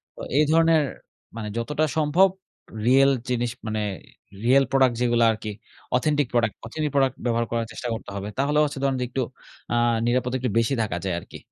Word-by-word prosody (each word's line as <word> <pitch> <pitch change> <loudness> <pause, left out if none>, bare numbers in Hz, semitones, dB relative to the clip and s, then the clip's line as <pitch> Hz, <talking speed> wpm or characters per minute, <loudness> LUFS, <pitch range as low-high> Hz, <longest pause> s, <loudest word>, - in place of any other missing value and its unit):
তো - - -15 0.2
এই 150 - +6
ধরনের 165 -1 +5 0.5
মানে 110 -2 -5
যতটা 150 +6 0
সম্ভব 155 +5 +4 0.6
রিয়েল 135 +2 +6 0.2
জিনিস 120 -1 0 0.2
মানে 110 0 -1 0.6
রিয়েল 135 +3 +5
প্রোডাক্ট 130 -3 +4
যেগুলা 120 -1 +3
আরকি, 110 -1 -5 0.5
অথেন্টিক 145 +1 +1
প্রোডাক্ট 110 -3 +1
অথেন্টিক 150 +5 -3
প্রোডাক্ট 135 -2 +3
ব্যবহার 115 -1 +1
করার 115 -1 0
চেষ্টা 125 - -6
করতে 110 - -7
হবে। 100 0 -4
তাহলে 145 +2 +1
হচ্ছে 145 -1 -5
ধরেন 135 -1 +1
যে 125 - 0
একটু 130 +1 -2 0.5
আ - - +2 0.3
নিরাপদ 125 0 +1
একটু 125 -1 -2
বেশি 115 +4 +1
থাকা 100 -5 -2
যায় 90 - 0
আরকি। - - -11
125 Hz, 175 wpm, -24 LUFS, 115-145 Hz, 0.6 s, এই